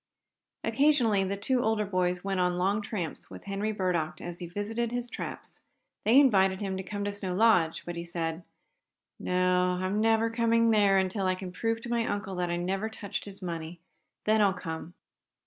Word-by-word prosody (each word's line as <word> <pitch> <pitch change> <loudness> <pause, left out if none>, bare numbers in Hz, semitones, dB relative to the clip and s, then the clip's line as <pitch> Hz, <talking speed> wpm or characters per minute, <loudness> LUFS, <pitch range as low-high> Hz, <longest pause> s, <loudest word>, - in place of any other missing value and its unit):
Occasionally 255 -9 +3
the 200 +1 -2
two 245 +5 +1
older 220 -2 +1
boys 180 -2 0
went 195 -1 -1
on 180 0 +1
long 195 +4 +1
tramps 185 -7 -5
with - - -10
Henry 200 +2 -2
Burdock 180 -6 -1
as 175 0 -6
he 175 - -5
visited 220 +6 -2
his 245 0 -3
traps. - - -7 0.4
They 235 +5 +7
invited 195 -8 +4
him 195 -2 -2
to - - -3
come 205 +2 -5
to 205 0 -2
Snow 190 -3 -3
Lodge, 185 -6 +3
but 175 - -5
he 170 - -4
said: 170 -1 -3 0.8
"No, 180 0 +2
I'm 190 +3 0
never 225 0 +3
coming 230 0 +3
there 205 -3 +4
until 190 +1 0
I 185 - +2
can 185 -1 -7
prove 225 +4 -1
to 240 - -7
my 235 -1 +1
uncle 200 -1 -3
that 180 -1 -1
I 175 - 0
never 190 +5 -1
touched 200 -2 -5
his 200 -1 -9
money. 165 -1 -5 0.5
Then 215 0 +4
I'll 200 -2 +4
come." 165 -1 -6
195 Hz, 190 wpm, -29 LUFS, 180-220 Hz, 0.8 s, They